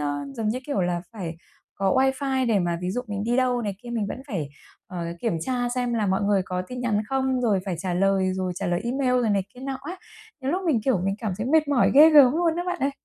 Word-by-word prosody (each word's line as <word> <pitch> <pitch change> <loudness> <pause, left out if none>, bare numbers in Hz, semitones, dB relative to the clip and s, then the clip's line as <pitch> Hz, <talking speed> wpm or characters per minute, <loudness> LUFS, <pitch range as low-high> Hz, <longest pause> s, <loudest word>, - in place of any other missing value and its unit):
ơ, 145 -1 -2
giống 220 -1 -2
như 230 +4 -1
kiểu 285 -9 -1
là, 175 -1 0
phải 175 -7 -6 0.4
có 195 0 0
wifi 265 0 +1
để 220 -3 +3
mà 175 -2 -1
ví 180 0 -2
dụ 245 - -2
mình 205 -1 -4
đi 240 +2 +1
đâu 250 -2 +1
này 205 -3 -3
kia 240 - -8
mình 225 -3 -1
vẫn 200 - -5
phải, 165 - -3 0.4
ờ, 175 -2 -5 0.2
kiểm 225 -8 -1
tra 245 +3 -1
xem 245 -1 -1
là 220 -3 0
mọi 190 +1 +1
người 200 -1 +2
có 180 0 -3
tin 250 +7 -7
nhắn 225 -4 +1
không? 265 0 0
Rồi 215 -6 +2
phải 190 -4 -3
trả 180 0 -2
lời, 190 0 +2
rồi 185 -1 -2
trả 195 +2 -3
lời 175 0 0
email, 255 +2 0
rồi 225 - +1
này 200 -2 +1
kia 250 - -12
nọ 270 0 -4
á. 345 +6 -6 0.4
Đôi 270 +2 -1
lúc 370 +2 -1
mình, 280 -9 +2
kiểu, 250 -9 +2
mình 195 0 0
cảm 215 -4 -3
thấy 220 - -2
mệt 310 +2 +3
mỏi 275 -4 +3
ghê 305 +3 +9
gớm 285 -5 +7
luôn 330 +1 +1
á 350 - -1
bạn 360 - -2
ơi! 275 +1 +1
230 Hz, 270 wpm, -25 LUFS, 190-265 Hz, 0.4 s, ghê